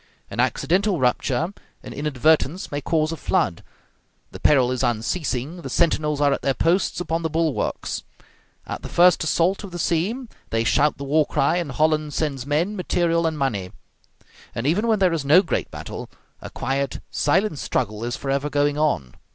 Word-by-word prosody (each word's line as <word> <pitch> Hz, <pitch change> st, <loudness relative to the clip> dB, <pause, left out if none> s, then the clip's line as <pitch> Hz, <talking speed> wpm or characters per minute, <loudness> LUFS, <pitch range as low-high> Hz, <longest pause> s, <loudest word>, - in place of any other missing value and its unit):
An -, -, -6 dB
accidental 190 Hz, +1 st, +1 dB
rupture, 130 Hz, +7 st, 0 dB, 0.3 s
an -, -, -8 dB
inadvertence, 150 Hz, -, +1 dB
may 145 Hz, 0 st, -2 dB
cause 155 Hz, 0 st, 0 dB
a -, -, -3 dB
flood; 95 Hz, -, 0 dB, 0.7 s
the -, -, -9 dB
peril 130 Hz, -4 st, +4 dB
is 130 Hz, -, -2 dB
unceasing; 130 Hz, +6 st, -2 dB
the -, -, -6 dB
sentinels 150 Hz, -3 st, +1 dB
are 145 Hz, -1 st, +3 dB
at -, -, -3 dB
their 135 Hz, -1 st, 0 dB
posts 175 Hz, +3 st, +1 dB
upon 165 Hz, -2 st, -2 dB
the 160 Hz, -, -1 dB
bulwarks; 160 Hz, -2 st, -1 dB, 0.6 s
at -, -, -5 dB
the -, -, -7 dB
first 175 Hz, -1 st, +5 dB
assault 170 Hz, +5 st, +1 dB
of 200 Hz, -, -7 dB
the 175 Hz, -, -7 dB
sea, 185 Hz, +10 st, -1 dB, 0.2 s
they 115 Hz, 0 st, 0 dB
shout 145 Hz, +5 st, +2 dB
the 140 Hz, -, -6 dB
war 150 Hz, +2 st, +2 dB
cry, 155 Hz, +5 st, +1 dB
and 165 Hz, -7 st, -3 dB
Holland 155 Hz, +1 st, +1 dB
sends 140 Hz, -4 st, -2 dB
men, 165 Hz, +8 st, 0 dB
material, 170 Hz, -3 st, +1 dB
and 160 Hz, -1 st, -2 dB
money. 105 Hz, -10 st, -2 dB, 0.8 s
And 115 Hz, -, -3 dB
even 190 Hz, +10 st, +2 dB
when 220 Hz, -1 st, +3 dB
there 185 Hz, -3 st, +3 dB
is 160 Hz, -4 st, -1 dB
no 155 Hz, +7 st, +6 dB
great -, -, -2 dB
battle, -, -, -7 dB, 0.3 s
a -, -, -7 dB
quiet, 135 Hz, +1 st, -2 dB
silent 170 Hz, +1 st, +1 dB
struggle 110 Hz, -3 st, -2 dB
is 120 Hz, +1 st, -3 dB
forever 140 Hz, +1 st, -1 dB
going 145 Hz, 0 st, +1 dB
on. 70 Hz, -, 0 dB
150 Hz, 175 wpm, -23 LUFS, 135-170 Hz, 0.8 s, no